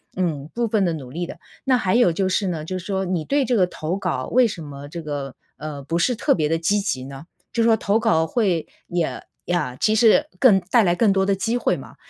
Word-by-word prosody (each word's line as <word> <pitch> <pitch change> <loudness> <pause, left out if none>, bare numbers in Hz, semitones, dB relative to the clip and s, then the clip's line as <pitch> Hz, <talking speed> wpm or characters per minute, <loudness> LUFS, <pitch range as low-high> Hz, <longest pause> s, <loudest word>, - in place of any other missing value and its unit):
嗯， 160 -5 -2
部 235 -1 0
分 210 -2 +1
的 170 - 0
努 130 -5 -7
力 175 +3 -4
的。 - - -9 0.3
那 260 -2 +4
还 190 -6 0
有 235 -8 +4
就 190 +3 0
是 190 +1 0
呢， 160 -4 -3
就 185 +3 -4
是 180 - -11
说 190 -1 -1
你 175 -3 -1
对 280 - +1
这 245 0 +1
个 185 -4 +3
投 160 0 -4
稿， 180 -10 -2
为 250 0 +5
什 190 -6 -6
么 145 -1 -9
这 165 +2 -7
个， 145 -3 -5 0.2
呃， 150 -2 -7
不 165 +5 -1
是 250 +8 +2
特 - - +2
别 155 -3 0
地 165 - +1
积 185 +6 +1
极 130 -10 -2
呢？ 135 +2 -9 0.3
就 230 - +1
说 225 -1 +4
投 205 +2 +1
稿 160 -8 +2
会 180 -3 0 0.2
也 175 -3 -2 0.2
呀， 150 -8 -1
其 215 - +2
实 225 +6 +5
更 215 -8 +6
带 225 +6 +2
来 175 -2 +2
更 210 0 +3
多 190 0 +2
的 200 - +2
机 225 +5 -1
会 - - 0
嘛， - - -12
180 Hz, 270 characters per minute, -22 LUFS, 160-215 Hz, 0.3 s, 更